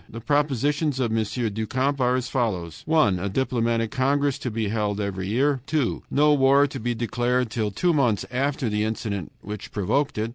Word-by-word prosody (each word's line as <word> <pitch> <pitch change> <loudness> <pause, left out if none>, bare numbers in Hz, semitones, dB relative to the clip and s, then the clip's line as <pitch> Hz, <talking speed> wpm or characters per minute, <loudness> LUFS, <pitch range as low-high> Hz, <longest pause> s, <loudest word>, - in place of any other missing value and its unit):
The 115 - -7
propositions 145 +2 0
of 115 -3 0
M. 110 - +2 0.3
du 110 +2 -3
Camp 135 +3 0
are 125 0 +3
as 130 -1 -1
follows: 95 - -2
1. 110 - +3
A 100 +3 -2
diplomatic 115 -1 0
congress 140 +1 +1
to 125 - -3
be 110 -2 -2
held 105 -1 -1
every 95 -2 -3
year. 135 +5 +1
2. 145 -6 0
No 150 +1 +4
war 140 0 +5
to 135 -1 -5
be 120 +1 -2
declared 120 +1 0
till 110 -2 -1
two 170 - +1
months 120 -9 +1
after 135 0 -1
the 105 -1 0
incident 105 -4 -3
which 105 0 -7
provoked 110 +9 0
it. 110 +2 -1
120 Hz, 190 wpm, -24 LUFS, 110-140 Hz, 0.3 s, war